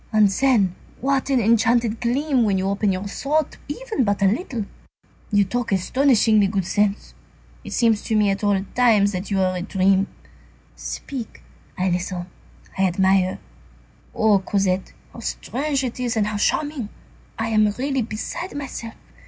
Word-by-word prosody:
And 215 -2 +5
then, 205 -4 +2 0.3
what 275 +1 0
an 265 -2 +3
enchanted 230 +1 +2
gleam 260 +3 +1
when 205 -4 +2
you 190 +1 -1
open 200 +1 +1
your 190 +2 -3
thought 295 +8 -1
even 295 - -2
but 205 -2 0
a - - +5
little! 225 - -2 0.7
You 205 -1 +4
talk 240 +4 -2
astonishingly 215 0 +3
good 195 -2 -1
sense. 205 +2 0 0.5
It - - -9
seems 225 -3 +2
to 220 - 0
me 210 -2 +3
at 195 - -3 0.3
times 220 -5 +4
that 185 0 -5
you 195 -2 0
are 185 -1 +1
a 180 - -3
dream. 195 0 +2 0.7
Speak, 255 -6 -7 0.3
I 185 0 +1
listen, 175 0 -2 0.5
I 190 - +2
admire. 190 +1 +2 0.8
Oh 215 -2 +4
Cosette! 190 -1 -1 0.2
how - - -10
strange 275 +1 -2
it 250 -1 -4
is 240 -2 -1
and 210 - +2
how 210 0 -2
charming! 280 +1 -1 0.5
I 225 0 -2
am 215 -1 +3
really 270 0 0
beside 230 - -5
myself. 245 -5 -6
215 Hz, 155 wpm, -22 LUFS, 195-250 Hz, 0.8 s, And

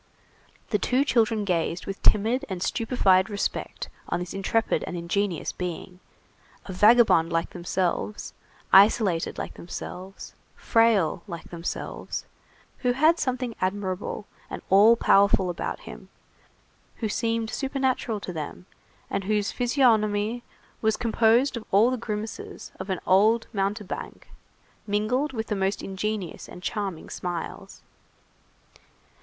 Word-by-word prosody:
The - - +2
two 260 +3 +2
children 225 -5 +2
gazed 170 -1 -1
with 195 0 -6
timid 225 +6 +3
and 185 -2 -3
stupefied 210 -5 +2
respect 205 -1 -3 0.2
on - - 0
this 180 -1 -5
intrepid 210 +4 0
and 180 - -4
ingenious 175 0 -1
being, 180 0 -6 0.7
a 190 - -6
vagabond 210 -5 +5
like 165 0 -1
themselves, 180 +3 -2 0.4
isolated 195 -3 +5
like - - -5
themselves, 185 +2 -8 0.2
frail 215 -7 +2
like 170 -4 -8
themselves, 170 0 -5 0.5
who 250 -1 +1
had 315 +6 +4
something 255 -2 -2
admirable 190 +1 -2 0.2
and - - -7
all 210 +4 +7
powerful 200 -4 +4
about 175 - -4
him, - - -11 0.9
who 220 - -2
seemed 225 +1 -1
supernatural 265 -5 -1
to 180 - -6
them, 160 +2 -6 0.4
and 195 - -3
whose 210 0 0
physiognomy 230 -3 +2 0.4
was 220 -1 +2
composed 235 +3 +3
of 235 - -6
all 215 +6 +5
the - - 0
grimaces 220 -1 -6
of 190 +1 -6
an 185 - -1
old 215 +5 +4
mountebank, 200 0 -4 0.6
mingled 225 +8 0
with 225 -3 -3
the 210 - -2
most 195 0 -1
ingenuous 195 -2 -4
and 180 - -11
charming 195 -6 -3
smiles. 175 -2 -6
205 Hz, 125 wpm, -26 LUFS, 185-230 Hz, 0.9 s, all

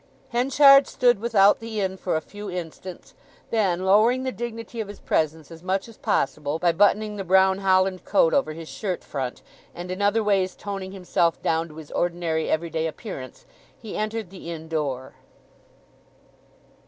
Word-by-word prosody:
Henchard 275 +3 +6
stood 245 -4 +2
without 210 -3 +4
the 225 -1 -5
inn 190 -1 -1
for 185 -2 -2
a 160 - 0
few 205 +3 -9
instants; 180 0 -7 0.4
then 190 -5 +1
lowering 220 +7 +4
the 260 - -2
dignity 230 -1 -6
of 215 - -5
his 205 - -10
presence 155 0 -1
as 165 -1 -11
much 190 +3 -1
as 230 - -13
possible 145 -1 -1
by 175 +1 +2
buttoning 210 +4 +2
the 195 - -3
brown 190 +1 +4
holland 185 -1 +2
coat 165 -5 +3
over 155 - +1
his 165 0 -9
shirt 190 -1 -4
front, 130 -3 -5 0.3
and 175 +1 -6
in 185 +2 -4
other 205 +2 +2
ways 195 -3 +1
toning 195 -2 -6
himself 175 -3 0
down 165 +1 +1
to 155 - -14
his 155 -2 -11
ordinary 170 -2 -1
everyday 160 0 -1
appearance, 155 - -8 0.3
he 220 -4 -8
entered 215 -3 -3
the 185 -3 -9
inn 160 -1 -7
door. 140 -5 -3
190 Hz, 165 wpm, -24 LUFS, 165-210 Hz, 0.4 s, Henchard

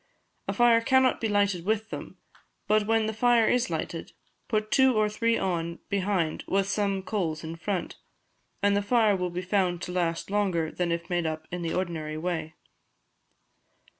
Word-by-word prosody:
A - - -1
fire 240 -1 +5
cannot 260 +2 +3
be 225 - 0
lighted 200 -4 +1
with 220 +2 -1
them, - - -7 0.5
but 210 0 +2
when 225 0 +2
the 220 - -2
fire 235 0 +4
is 250 +1 +2
lighted, - - -4 0.3
put 215 -1 -1
two 265 -2 +5
or 215 0 +3
three 230 +2 +1
on 170 -2 -2
behind 190 -5 0
with 195 0 +1
some 200 -1 0
coals 170 -7 -2
in 160 +1 -5
front, 185 +2 -3 0.7
and 200 0 +4
the 205 - +2
fire 215 -1 +3
will 180 -1 -2
be 175 +1 -4
found 185 -2 +1
to 180 - -5
last 175 0 -1
longer 185 -6 0
than 175 -1 -1
if 170 0 -2
made 175 -2 0
up 155 0 -4
in 180 0 -4
the 165 -1 -2
ordinary 160 -4 -3
way. 160 -1 -3
195 Hz, 175 wpm, -27 LUFS, 170-215 Hz, 0.7 s, fire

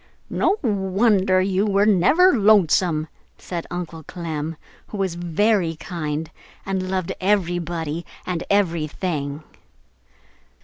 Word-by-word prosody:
"No 395 - +2
wonder 195 -2 +2
you 190 +1 +1
were 200 0 +3
never 220 - +5
lonesome!" 185 -7 +3 0.3
said 170 -2 -6
Uncle 175 -2 -5
Clem, 160 -1 -5 0.3
who 210 - -7
was 190 -3 -1
very 175 +1 +1
kind 155 -1 -4 0.3
and 190 -1 -2
loved 185 -2 -1
everybody 175 -4 -1 0.2
and 180 -2 -2
everything. 160 -5 -1
180 Hz, 100 wpm, -22 LUFS, 165-195 Hz, 0.3 s, never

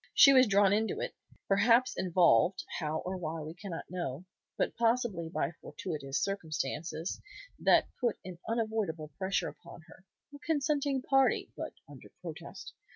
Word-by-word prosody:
She 275 - +9
was 255 -2 +7
drawn 200 -1 +4
into 220 +1 0
it, - - -3 0.3
perhaps 230 +5 +4
involved, 180 - +3 0.2
how 155 0 -2
or 185 +1 -3
why 165 -2 -4
we 155 +1 -6
cannot 175 -2 -7
know, 175 -3 -4 0.3
but - - 0
possibly 230 -8 +1
by 170 - -1
fortuitous 145 -6 -4
circumstances 160 -3 -3 0.4
that - - +5
put 240 -4 0
an 180 -2 -8
unavoidable 215 -9 -1
pressure 190 0 0
upon 170 0 -13
her; 170 +3 -17 0.3
a 285 - -10
consenting 285 -3 0
party, 270 -1 +2
but - - -5
under - - -13
protest. - - -8
190 Hz, 145 wpm, -31 LUFS, 165-230 Hz, 0.4 s, She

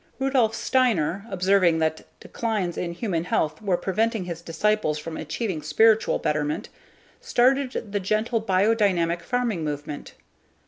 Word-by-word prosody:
Rudolf 260 -5 +2
Steiner, 215 - +1
observing 185 -2 +3
that 160 0 -1
declines 210 -7 -2
in 170 -1 -3
human 175 -3 -2
health 155 -2 -1
were 195 -4 +1
preventing 215 +3 -1
his 170 -1 -6
disciples 170 -2 0
from 160 +1 -6
achieving 160 +3 -3
spiritual 220 +9 +3
betterment 150 +5 -2 0.5
started 255 -3 +1
the 205 - 0
gentle 215 +4 0
biodynamic 190 -4 +2
farming 230 -3 -1
movement. 145 -1 -5
190 Hz, 125 wpm, -24 LUFS, 165-225 Hz, 0.5 s, observing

